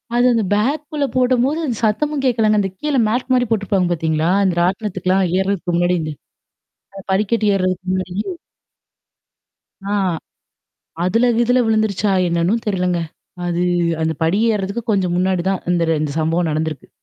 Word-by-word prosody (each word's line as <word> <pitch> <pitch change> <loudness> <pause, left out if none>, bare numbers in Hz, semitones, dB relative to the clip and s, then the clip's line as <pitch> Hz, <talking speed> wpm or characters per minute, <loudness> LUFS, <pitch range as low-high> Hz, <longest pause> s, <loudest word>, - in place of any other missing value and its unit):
அது 245 +1 +3
அந்த 225 -2 +1
பேக்குள்ள 285 +6 0
போட்டும்போது 255 +3 +2
அந்த 245 -5 -2
சத்தமும் 290 +7 0
கேட்கலங்க. 220 -4 +3
அந்த 195 - -1
கீழ 300 -1 -2 0.2
மேட் 250 +3 -1
மாரி 250 -1 +3
போட்டுருப்பாங்க 200 -4 +1
பார்த்தீங்களா? 160 0 0
அந்த 185 -3 +1
ராட்டணத்துக்கலாம் 190 0 0
ஏர்றதுக்கு 190 -2 -1
முன்னாடி 175 +1 +2
இந்த 155 -1 -4 0.9
அ - - -6
படிக்கட்டு 210 +2 +1
ஏர்றதுக்கு 185 0 -1
முன்னாடி. 185 -1 -3 1.7
ஆ. 200 - -3 1.1
அதுல 230 +7 +2
கிதுல 245 +2 +3
விழுந்துருச்சா? 215 -2 +1 0.2
என்னன்னும் 170 +7 0
தெரிலங்க. 180 -3 0 0.5
அது 175 0 -1 0.4
அந்த 160 0 +1
படி 170 +5 +2
ஏறுறதுக்கு 200 +3 -3
கொஞ்சம் 185 -4 +1
முன்னாடி 185 -1 +1
தான் 190 - -2
இந்த 170 -1 +1 0.2
இந்த 150 -2 -2
சம்பவம் 165 +2 0
நடந்திருக்கு. 155 -2 -3
195 Hz, 135 wpm, -19 LUFS, 175-230 Hz, 1.7 s, அது